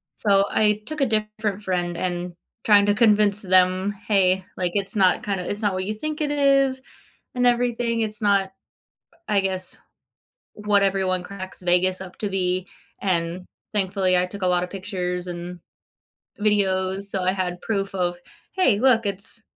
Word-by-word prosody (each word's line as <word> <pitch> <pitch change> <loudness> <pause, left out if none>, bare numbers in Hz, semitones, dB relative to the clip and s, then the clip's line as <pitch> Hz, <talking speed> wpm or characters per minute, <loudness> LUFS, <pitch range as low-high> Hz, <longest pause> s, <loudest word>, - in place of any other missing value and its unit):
So, 200 -1 +3
I 210 0 +2
took 310 +1 -5
a 275 - +4
different 215 -2 -2
friend, 175 -2 -2
and 175 -1 -3 0.3
trying 205 -2 +5
to 205 - +3
convince 210 -2 +4
them, 185 +1 +3 0.2
"Hey," 190 -2 +2
like, 180 -2 -1
"it's 200 0 -2
not 190 -3 +3
kinda 195 -3 -3
it's 205 - -3
not 205 -3 +1
what 185 - -2
you 215 - -2
think 305 +8 -5
it 295 -1 0
is, 275 -2 +2 0.5
and 250 0 +1
everything, 240 -1 +1
it's 215 +1 -3
not, 195 -2 +2 0.7
I 205 -2 +2
guess, 190 -1 -2 0.8
what 210 -1 +1
everyone 190 -2 0
cracks 190 -1 -7
Vegas 180 +1 +2
up 185 -1 -9
to 205 - -2
be." 185 -1 -1 0.3
And, 180 -1 -1 0.3
thankfully 190 -2 +1
I 180 - 0
took 200 +1 -8
a 185 - +2
lot 180 0 +2
of 180 - -5
pictures 180 -2 -4
and, 175 0 -7 0.8
videos. 195 -2 +1
So, 200 -1 -1
I 185 - +2
had 180 -2 -3
proof 195 -3 -2
of, 175 -1 -1 0.3
"Hey, 260 - +2
look, 230 -3 +3
it's 200 +3 -4
195 Hz, 165 wpm, -23 LUFS, 185-215 Hz, 0.8 s, trying